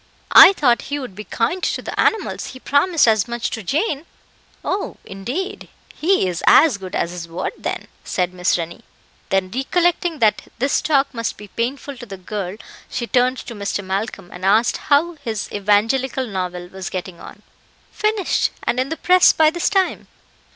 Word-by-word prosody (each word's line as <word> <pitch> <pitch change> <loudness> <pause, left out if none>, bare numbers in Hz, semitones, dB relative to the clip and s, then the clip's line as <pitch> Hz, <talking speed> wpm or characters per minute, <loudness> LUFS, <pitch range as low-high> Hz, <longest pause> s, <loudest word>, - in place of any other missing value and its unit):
"I 390 - +11
thought 250 -9 +2
he 285 - -1
would 255 -8 -6
be 210 +3 -9
kind 245 +11 -1
to - - -1
the - - -6
animals; 445 - +1
he - - -15
promised 285 +3 +3
as 215 -3 +3
much 235 -1 -3
to 225 - -4
Jane." 295 - -1 0.6
"Oh! 390 +2 -2
indeed, 250 - -5 0.2
he 355 - +2
is 175 -2 -3
as 285 -10 +6
good 185 -1 -7
as 170 - -1
his 175 -1 -7
word, 165 +1 -4
then," - - -5 0.2
said 180 -1 -1
Miss 180 0 +1
Rennie. 170 0 -6 0.5
Then, 190 -1 0
recollecting 345 +5 +1
that 220 -5 +2
this 270 +4 +1
talk 280 -2 +1
must 230 -1 -3
be 210 -1 -11
painful 260 +5 -3
to 240 - -10
the 195 -2 -8
girl, 190 0 -5 0.3
she 240 - -3
turned 255 +1 +2
to 240 - -7
Mr. 200 -1 -3
Malcolm, 190 -1 -4
and 180 - -10
asked 215 +5 +3
how 315 +4 +3
his 220 -4 -3
evangelical 225 +6 +1
novel 180 -4 -4
was 190 -1 -6
getting 185 -1 -6
on. - - -12 0.5
"Finished, 425 -3 0
and 250 - 0
in 260 +1 0
the 320 - -3
press 365 0 +6
by 310 -1 +4
this 345 +1 0
time." 385 -3 0
235 Hz, 180 wpm, -20 LUFS, 195-295 Hz, 0.6 s, I